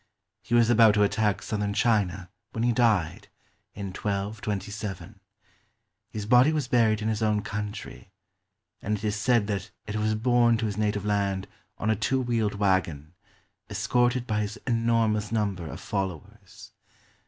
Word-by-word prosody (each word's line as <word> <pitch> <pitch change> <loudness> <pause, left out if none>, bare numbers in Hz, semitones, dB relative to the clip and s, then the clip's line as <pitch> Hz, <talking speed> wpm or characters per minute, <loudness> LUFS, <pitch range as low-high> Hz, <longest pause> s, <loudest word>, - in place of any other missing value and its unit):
He 120 - -1
was 120 0 +5
about 110 -2 +6
to 105 - +4
attack 105 0 +1
southern 105 -1 -2
China 100 -6 +1 0.2
when 115 - -2
he 120 - +3
died, 110 -9 +1 0.5
in 100 -1 -5
1227. 100 -1 -4 0.9
His 105 -3 -5
body 125 +6 +5
was 150 -5 -1
buried 110 -4 +2
in - - -1
his 110 0 -1
own 105 -1 +1
country, 105 0 -6 0.7
and 105 +1 -1
it 100 - -12
is 105 -1 0
said 115 0 +2
that 100 -3 -3 0.2
it 105 0 -4
was 110 0 0
borne 120 0 +3
to 115 - -2
his 105 -2 -2
native 105 -1 -1
land 100 -2 0 0.3
on 110 - 0
a - - +2
two 120 +6 0
wheeled 115 -5 0
wagon, 95 -6 0 0.6
escorted 120 +4 +1
by 105 -3 -1
his 105 +1 -4
enormous 115 -3 +1
number 100 -6 -1
of - - -7
followers. 95 -6 -6
105 Hz, 155 wpm, -26 LUFS, 100-115 Hz, 0.9 s, about